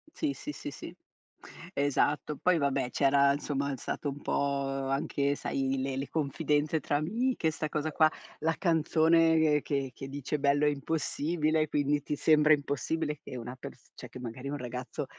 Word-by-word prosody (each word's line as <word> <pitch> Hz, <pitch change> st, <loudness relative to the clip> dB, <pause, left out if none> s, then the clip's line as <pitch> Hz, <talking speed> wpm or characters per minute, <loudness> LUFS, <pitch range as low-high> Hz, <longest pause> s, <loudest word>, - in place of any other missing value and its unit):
Sì, 295 Hz, -3 st, -1 dB
sì, 295 Hz, -, -6 dB
sì, -, -, -7 dB
sì, -, -, -9 dB, 0.8 s
esatto. 145 Hz, +1 st, +1 dB
Poi 180 Hz, -2 st, +3 dB
vabbè 135 Hz, -3 st, 0 dB
c'era, 140 Hz, 0 st, +4 dB
insomma, 140 Hz, -1 st, -2 dB
stato 145 Hz, -, -3 dB
un 140 Hz, +1 st, -7 dB
po' 140 Hz, -1 st, 0 dB, 0.2 s
anche 140 Hz, +1 st, 0 dB
sai, 135 Hz, -1 st, -1 dB
le 135 Hz, 0 st, -2 dB
le 135 Hz, +1 st, -3 dB
confidenze 150 Hz, +1 st, 0 dB
tra 145 Hz, -, 0 dB
amiche, 210 Hz, -, 0 dB
'sta 155 Hz, -1 st, -3 dB
cosa 155 Hz, 0 st, -2 dB
qua, 155 Hz, +1 st, +5 dB, 0.3 s
la 160 Hz, +1 st, +1 dB
canzone 160 Hz, -2 st, +3 dB
che 135 Hz, -3 st, -2 dB
che 135 Hz, -, -8 dB
dice 145 Hz, +1 st, -3 dB
"bello 145 Hz, +1 st, +3 dB
e 150 Hz, -, +4 dB
impossibile", 155 Hz, +1 st, 0 dB
quindi 145 Hz, 0 st, +1 dB
ti 150 Hz, -, -2 dB
sembra 155 Hz, -1 st, +5 dB
impossibile 150 Hz, +1 st, -1 dB
che 130 Hz, -, -7 dB
una 125 Hz, +2 st, -6 dB
pers -, -, -11 dB
cioè -, -, -9 dB
che -, -, -10 dB
magari 125 Hz, +3 st, -6 dB
un 145 Hz, -, -3 dB
ragazzo 125 Hz, -1 st, -5 dB
145 Hz, 165 wpm, -30 LUFS, 140-155 Hz, 0.8 s, qua